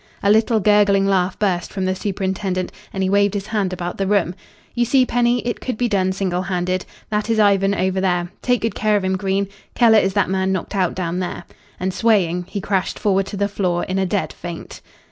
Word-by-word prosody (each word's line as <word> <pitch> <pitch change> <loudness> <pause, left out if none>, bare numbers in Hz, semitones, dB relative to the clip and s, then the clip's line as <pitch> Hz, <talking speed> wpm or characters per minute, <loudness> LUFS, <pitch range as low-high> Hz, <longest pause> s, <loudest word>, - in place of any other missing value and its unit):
A 200 - +4
little 220 +1 +3
gurgling 205 -1 +4
laugh 190 -1 +1
burst 180 -4 -1
from 190 -2 -2
the 185 - +1
superintendent, 190 -1 -2 0.2
and 195 - -2
he 185 - +1
waved 200 0 +3
his 200 -1 -3
hand 210 -3 -1
about 175 0 -5
the 195 - 0
room. 195 -4 +2 0.4
"You 240 - +1
see, 255 +2 +3
Penny, 245 0 +1
it 240 - -2
could 255 -4 -3
be 245 - +1
done, 190 -4 +1
single 185 -2 -1
handed. 185 0 -2 0.2
That 210 +2 -1
is 225 - +2
Ivan 200 -1 +3
over 190 0 0
there. 175 -1 0
Take 245 -1 +1
good 225 - -1
care 215 -1 +2
of 200 - -2
him, 190 0 0
Green. 195 +1 0 0.3
Keller 225 -3 +6
is 190 -1 0
that - - +2
man 190 0 +1
knocked 190 +2 -3
out 185 -3 +1
down 180 -1 -2
there." 180 -1 -4 0.4
And, 185 0 -2
swaying, 180 -6 +2
he 205 - -3
crashed 195 -1 -1
forward 195 -2 +1
to 200 - -6
the 200 +1 +1
floor 180 -4 -1
in 190 +1 -2
a 190 - +1
dead 200 +1 -1
faint. 175 -1 -8
195 Hz, 220 wpm, -20 LUFS, 185-210 Hz, 0.4 s, Keller